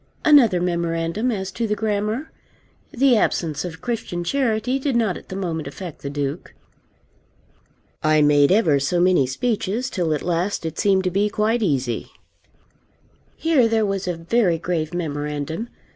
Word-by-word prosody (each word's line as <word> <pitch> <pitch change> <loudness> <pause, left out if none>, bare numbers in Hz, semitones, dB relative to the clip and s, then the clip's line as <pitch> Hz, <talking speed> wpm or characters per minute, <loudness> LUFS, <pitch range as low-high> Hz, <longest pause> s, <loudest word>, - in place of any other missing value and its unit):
Another 255 -12 +6
memorandum 170 +5 -1
as 190 -3 -3
to 230 +4 -2
the 210 - 0
grammar. 215 +6 -2 0.6
The 260 0 +3
absence 160 -7 0
of 165 -3 -7
Christian 210 -7 -3
charity 250 +3 0
did 275 -2 -1
not 220 -6 +1
at - - -11
the 190 - -5
moment 165 -6 -3
affect 165 +3 -8
the 140 - -4
Duke. 145 +2 -4 1.5
I 155 0 +3
made 145 0 +4
ever 170 -9 +4
so 140 +6 0
many 175 -7 +3
speeches, 225 - -2
till 175 -4 -1
at - - -5
last 175 +1 -1
it 160 0 -4
seemed 195 -3 +3
to 185 - 0
be 200 +3 +1
quite 220 +3 0
easy. 135 - -1 1.3
Here 310 -8 +3
there 225 -1 +1
was 195 -2 -2
a 175 -2 -2
very 175 +1 +1
grave 165 -2 -2
memorandum. 150 +4 -4
185 Hz, 155 wpm, -22 LUFS, 160-220 Hz, 1.5 s, Another